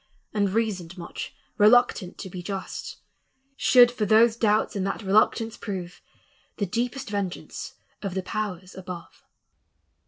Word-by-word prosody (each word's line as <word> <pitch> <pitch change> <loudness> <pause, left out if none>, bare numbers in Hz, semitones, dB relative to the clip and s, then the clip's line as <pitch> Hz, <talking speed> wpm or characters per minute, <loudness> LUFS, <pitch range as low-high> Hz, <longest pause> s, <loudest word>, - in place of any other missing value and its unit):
And 205 -2 +2
reasoned 190 -4 -1
much, 170 - -7 0.2
reluctant 210 -4 +4
to 195 - -6
be 180 - -6
just, 190 +1 -5 0.6
Should 245 -3 +6
for 220 -4 -1
those 220 +2 +6
doubts 215 -2 +2
and 195 - -1
that 205 - -3
reluctance 215 +3 +2
prove 180 -4 -6 0.6
The 205 - 0
deepest 245 +4 -2
vengeance 200 -3 -4 0.3
of 195 -3 -4
the 190 - -1
powers 190 -3 -4
above." 180 -2 -9
205 Hz, 130 wpm, -26 LUFS, 185-225 Hz, 0.6 s, Should